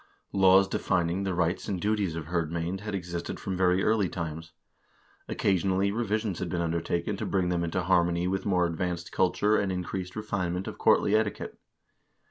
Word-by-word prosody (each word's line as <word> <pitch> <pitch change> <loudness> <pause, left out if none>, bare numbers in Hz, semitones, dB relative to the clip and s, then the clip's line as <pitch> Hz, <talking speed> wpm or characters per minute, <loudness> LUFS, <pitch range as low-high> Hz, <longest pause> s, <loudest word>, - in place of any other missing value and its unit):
Laws 95 0 +6
defining 90 +1 0
the 95 -2 -1
rights 85 +1 0
and 95 -3 -2
duties 100 -3 0
of 80 -2 -5
hirdmcend 85 +2 -2
had 105 0 -4
existed 85 -2 -5
from 95 - -3
very 90 +1 +2
early 105 -4 +2
times. 80 -1 -5 0.8
Occasionally 95 +1 +1
revisions 110 -3 -1
had 95 - -3
been 85 - -2
undertaken 85 +3 -1
to - - -3
bring 95 -2 +1
them 85 -1 0
into 85 +2 -1
harmony 85 -1 +2
with 95 +1 -1
more 90 -3 +2
advanced 85 +1 -3
culture 105 +4 +2
and 100 -2 0
increased 90 0 -4
refine 100 -5 -2
ment 90 +1 -4
of - - -7
courtly 100 - +4
etiquette. 110 -2 -1
90 Hz, 170 wpm, -28 LUFS, 85-100 Hz, 0.8 s, Laws